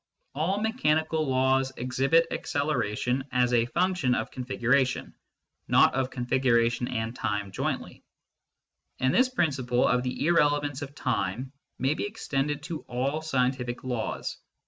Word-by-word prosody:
All 170 +8 0
mechanical 160 - +1
laws 130 0 +2
exhibit 135 +7 +2
acceleration 135 -3 -1
as 125 -1 +2
a 120 -1 +3
function 175 -5 +1
of - - -3
configuration, 130 +1 0 0.5
not - - +5
of 130 0 0
configuration 120 -1 +1
and 115 0 -3
time 105 -4 -2
jointly; - - -4 1.0
and 130 +1 +2
this 255 +1 +4
principle 130 - +1
of 125 - +2
the 125 +3 -2
irrelevance 145 -4 +2
of 145 - -3
the 140 - -23
time 125 0 -2 0.3
may 135 +3 +1
be 180 - -3
extended 145 -9 -2
to 160 -1 -5
all 135 +5 -1
scientific 125 -4 -1
laws. 125 -4 -3
130 Hz, 130 wpm, -27 LUFS, 125-150 Hz, 1.0 s, not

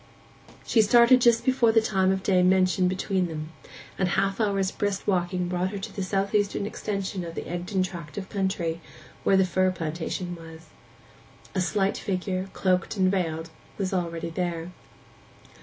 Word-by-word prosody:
She 225 - +4
started 240 +4 +6
just 235 -1 +4
before 255 -3 +4
the 225 - +5
time 190 -4 +2
of 190 0 -1
day 185 -2 +3
mentioned 185 0 +3
between 185 0 0
them, 155 -1 -6 0.5
and 185 -1 +2
half 195 +2 0
an 215 -2 +2
hour's 195 -1 0
brisk 200 -1 -2
walking 180 -2 0
brought 180 +1 -1
her 200 - -5
to 195 - -7
the 195 - -3
south 195 +1 -1
eastern 205 -1 +1
extension 195 -3 -3
of 165 -1 -7
the - - -4
Egdon 180 +2 -1
tract 170 -4 -7
of 190 -2 -4
country, 190 -5 -2 0.4
where 195 - +4
the 190 - +4
fir 185 +1 +2
plantation 175 +1 -4
was. 160 -1 -12 0.8
A 190 - 0
slight 195 +1 0
figure, 185 0 -2
cloaked 185 +2 0
and 185 -1 +3
veiled, 165 -4 -2 0.3
was 195 -1 -2
already 170 -2 -2
there. 170 0 -3
185 Hz, 170 wpm, -26 LUFS, 175-195 Hz, 0.8 s, started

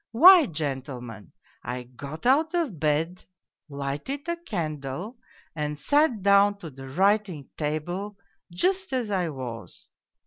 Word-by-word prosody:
Why, 345 +4 +9
gentlemen, 130 - -5 0.3
I 125 +1 -5
got 140 - -9
out 310 +7 +3
of 290 - -1
bed, 160 +4 0 0.5
lighted 145 - -4
a 340 - 0
candle, 175 - -5 0.4
and 150 -1 -3
sat 255 - +2
down 200 0 +5
to 170 -6 -9
the 135 0 -10
writing 190 -2 +1
table 175 +7 -3 0.3
just 375 - 0
as 240 -5 -1
I 180 -4 0
was. 125 -5 -7
170 Hz, 125 wpm, -26 LUFS, 140-230 Hz, 0.5 s, Why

